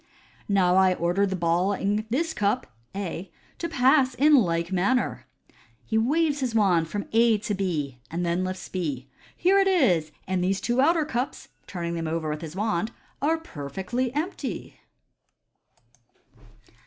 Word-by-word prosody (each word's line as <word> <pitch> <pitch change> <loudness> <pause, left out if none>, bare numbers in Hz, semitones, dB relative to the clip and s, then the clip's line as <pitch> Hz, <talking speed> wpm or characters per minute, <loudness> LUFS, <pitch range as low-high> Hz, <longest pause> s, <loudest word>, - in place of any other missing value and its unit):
" - - -30
Now 185 -2 +3
I 190 -1 +5
order 175 +4 +1
the 190 - -2
ball 175 +3 +1
in 205 +2 -1
this 320 +7 0
cup 210 +5 0 0.3
(A) 185 -2 -5 0.3
to 335 - -3
pass 265 -2 +3
in 295 +3 +5
like 170 -7 +2
manner." 200 +8 0 0.6
He 220 - -3
waves 290 +6 +2
his 250 -4 -2
wand 180 -7 +3
from 205 +2 -3
A 230 -1 +5
to 210 +1 -3
B, 155 -10 -2
and 175 +2 -2
then 170 +2 0
lifts 185 0 -4
B. 145 -8 -4
" - - -26
Here 385 +3 +4
it 390 - +3
is, 225 - +3
and 185 -1 -1
these 190 +1 +1
two 240 +2 +1
outer 320 +2 +3
cups 255 -3 -3
" - - -40
(turning 170 -2 -4
them 165 -1 -3
over 160 -1 -2
with - - -10
the 165 +2 -8
wand) 215 -1 0 0.2
'* - - -37
are 315 +4 +2
per 145 - -8
fectly 240 - -2
empty." 330 +6 -4
200 Hz, 170 wpm, -26 LUFS, 175-255 Hz, 0.6 s, I